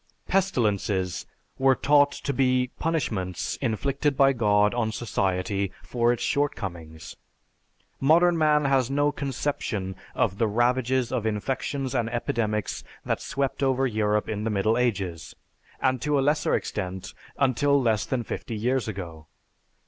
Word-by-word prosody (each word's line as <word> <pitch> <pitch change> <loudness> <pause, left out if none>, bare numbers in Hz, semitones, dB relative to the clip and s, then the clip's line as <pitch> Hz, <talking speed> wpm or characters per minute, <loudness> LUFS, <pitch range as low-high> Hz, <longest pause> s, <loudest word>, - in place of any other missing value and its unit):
Pestilences 105 - 0 0.3
were 135 0 +5
taught 145 +1 +4
to 140 - -4
be 125 -1 +2
punishments 105 - -2
inflicted 140 +4 -1
by 135 0 +5
God 105 -3 +3
on 115 -2 0
society 100 -3 -1
for 120 -1 +1
its 120 - -2
shortcomings. 85 - -3 0.8
Modern 170 +5 +4
man 150 -2 +3
has 135 -3 +2
no 145 +1 +2
conception 130 -8 -3 0.2
of 95 - 0
the 115 - +3
ravages 125 +2 +1
of 120 -4 -1
infections 130 +5 -2
and 120 -3 0
epidemics 110 -3 -2 0.2
that - - -1
swept 135 0 -2
over 135 -1 +2
Europe 105 -3 0
in 105 -1 -3
the 115 - 0
Middle 105 +2 +1
Ages, 100 -9 -2 0.4
and 130 -2 +1
to 150 +1 +1
a - - +3
lesser 150 0 +2
extent, 95 -2 -4 0.2
until 140 +2 +3
less 110 -6 +1
than 130 -3 -2
fifty 115 - -5
years 125 +4 0
ago. 85 -7 -7
120 Hz, 135 wpm, -26 LUFS, 105-135 Hz, 0.8 s, were